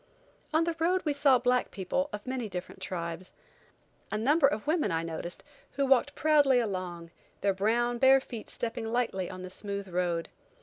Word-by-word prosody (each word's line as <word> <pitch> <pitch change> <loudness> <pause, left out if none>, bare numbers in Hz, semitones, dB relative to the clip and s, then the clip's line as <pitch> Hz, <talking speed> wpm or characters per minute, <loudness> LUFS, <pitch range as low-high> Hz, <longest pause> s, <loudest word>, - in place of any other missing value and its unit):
On 315 +2 +3
the 335 0 -1
road 360 +3 +2
we 300 - +1
saw 280 -2 +5
black 250 +1 +1
people 240 +10 -2
of 210 - -6
many 255 -4 -3
different 180 0 -7
tribes. 170 -1 -5 0.8
A - - 0
number 280 +7 +4
of 210 -3 -2
women 310 - +1
I 165 0 0
noticed, 165 +1 -5 0.3
who 275 - +1
walked 270 +2 +3
proudly 290 -4 +4
along, 180 -6 -4 0.3
their 200 -1 +2
brown, 235 +5 +1
bare 265 +1 +7
feet 235 -4 -8
stepping 225 -1 -4
lightly 230 -7 -1
on 185 0 -8
the 185 - -7
smooth 200 0 -5
road. 175 -2 -1
225 Hz, 175 wpm, -29 LUFS, 185-270 Hz, 0.8 s, bare